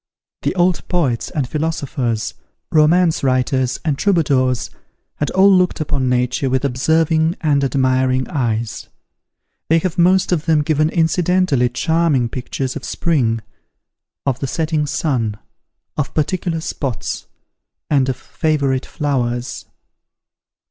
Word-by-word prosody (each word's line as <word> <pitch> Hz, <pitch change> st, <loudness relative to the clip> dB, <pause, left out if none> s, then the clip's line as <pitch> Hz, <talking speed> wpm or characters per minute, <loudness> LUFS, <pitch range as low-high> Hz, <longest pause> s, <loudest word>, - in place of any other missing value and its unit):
The -, -, -1 dB
old 180 Hz, 0 st, +1 dB
poets 140 Hz, -10 st, 0 dB
and 140 Hz, -5 st, -2 dB
philosophers, 140 Hz, -6 st, -2 dB, 0.4 s
romance 165 Hz, +2 st, +3 dB
writers, 130 Hz, -1 st, +1 dB
and 145 Hz, -4 st, 0 dB
troubadours, 135 Hz, -, +1 dB, 0.5 s
had 150 Hz, -, -1 dB
all 195 Hz, +1 st, +5 dB
looked 180 Hz, -1 st, +2 dB
upon 140 Hz, -4 st, -1 dB
Nature 125 Hz, +3 st, 0 dB
with 130 Hz, +2 st, 0 dB
observing 160 Hz, +5 st, +2 dB
and 145 Hz, -3 st, +2 dB
admiring 130 Hz, -1 st, +1 dB
eyes. 115 Hz, -5 st, -2 dB, 0.8 s
They 165 Hz, -, +5 dB
have 170 Hz, 0 st, -2 dB
most 185 Hz, +2 st, +4 dB
of 165 Hz, -3 st, 0 dB
them 155 Hz, -2 st, +3 dB
given 155 Hz, 0 st, +2 dB
incidentally 170 Hz, -5 st, +2 dB
charming 160 Hz, -6 st, +1 dB
pictures 130 Hz, +1 st, -4 dB
of 145 Hz, -, -6 dB
spring, 120 Hz, -9 st, 0 dB, 0.8 s
of 135 Hz, -2 st, 0 dB
the 135 Hz, -, -2 dB
setting 155 Hz, +1 st, -1 dB
sun, 125 Hz, -8 st, -1 dB, 0.6 s
of 150 Hz, -, -3 dB
particular 165 Hz, +1 st, -1 dB
spots, 135 Hz, -7 st, -4 dB, 0.6 s
and 135 Hz, -3 st, +2 dB
of 130 Hz, -, -1 dB
favourite 140 Hz, -5 st, -1 dB
flowers. 125 Hz, -5 st, -2 dB
145 Hz, 120 wpm, -19 LUFS, 130-165 Hz, 0.8 s, all